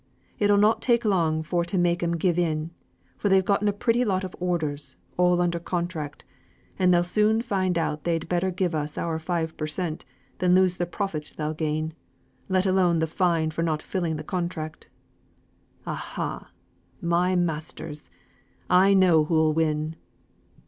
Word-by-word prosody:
It'll 205 0 +4
not 210 +2 +4
take 235 -2 +2
long 165 -6 +2
for 170 +2 0
to 175 +3 -2
make 175 -1 +2
'em 170 0 0
give 175 0 +1
in, 160 -1 -1 0.5
for 205 - +1
they've 190 -1 +4
getten 205 +2 +2
a - - +4
pretty 230 +4 +1
lot 195 -5 0
of 185 - -6
orders, 150 -6 -2 0.2
all 180 0 +3
under 175 -1 +1
contract; 170 -4 -4 0.5
and 185 -1 +4
they'll 175 0 +4
soon 215 +5 +2
find 185 -6 0
out 155 -2 -1
they'd 165 -2 -1
better 180 +2 0
give 180 -1 -1
us 150 -1 -3
our 165 -1 -2
five 160 -1 -2
per 155 - -2
cent. 160 0 -3 0.4
than 180 0 +4
lose 185 -1 +3
the 175 - -1
profit 175 -5 -4
they'll 155 0 -2
gain; 155 0 -2 0.6
let 185 0 +2
alone 185 -3 +3
the 160 - +2
fine 165 -1 +1
for 165 - -3
not 160 -2 -1
fulfilling 170 -4 -2
the 150 - -5
contract. 170 -4 -4 1.0
Aha - - -5 0.5
my 175 +2 +1
masters! 155 -3 -3 0.6
I 190 +2 +6
know 175 -5 +5
who'll 160 -1 +2
win." 155 0 0
175 Hz, 165 wpm, -25 LUFS, 160-185 Hz, 1.0 s, I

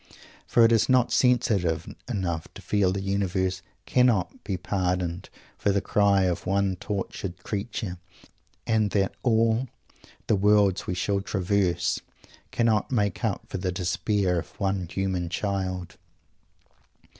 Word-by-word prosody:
For 115 - +5
it 115 - +4
is 115 +1 +3
not 125 -2 +4
sensitive 100 -10 +2 0.2
enough 90 -8 -2
to - - -9
feel 100 -3 +2
that 100 +1 -2
the - - -6
Universe 95 -1 0 0.2
cannot 120 -8 +2
be 95 - -2
pardoned 90 -1 -2 0.3
for 100 - +2
the 100 - +2
cry 100 -1 +3
of 90 -2 -1
one 100 0 +1
tortured 95 -2 -5
creature, 100 -3 -4 0.7
and 110 -2 +2
that 95 -1 +1
all 115 +1 +2 0.6
"the 110 - +3
worlds 100 -1 +3
we 90 - -1
shall 100 +2 0
traverse" 95 -1 0 0.5
cannot 115 -2 +1
make 105 -4 0
up 110 -4 -1
for 95 - -4
the 90 0 -1
despair 90 +1 0
of - - -11
one 95 -3 -1
human 95 -2 -2
child. 95 -2 -3
100 Hz, 135 wpm, -26 LUFS, 90-105 Hz, 0.7 s, For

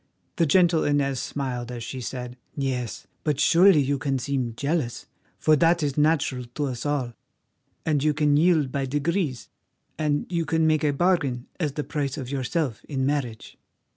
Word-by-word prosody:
The 165 - +3
gentle 170 +1 +4
Inez 140 -2 +1
smiled 125 -4 -4
as 120 -2 -6
she 130 +2 -6
said: 125 0 -5 0.2
"Yes, 130 -4 -3 0.2
but 150 -3 0
surely 170 +1 +6
you 140 +1 0
can 135 -2 0
seem 130 -3 -2
jealous, 140 -4 -1 0.3
for 155 - +4
that 170 +1 +3
is 140 -2 -1
natural 150 -4 +1
to 145 - -1
us 130 0 -3
all, 135 -5 -1 0.7
and 150 -3 +1
you 155 - +4
can 150 -1 +3
yield 155 -4 +3
by 135 0 -1
degrees, 145 - -1 0.5
and 150 -1 0
you 170 -2 -1
can 160 +1 +1
make 155 -1 +2
a 150 - +3
bargain 140 -6 +1
as 150 -5 -1
the 150 - -3
price 145 -2 -3
of 130 -2 -5
yourself 135 - -2
in 135 -3 -2
marriage." 135 -6 -3
145 Hz, 170 wpm, -25 LUFS, 130-155 Hz, 0.7 s, surely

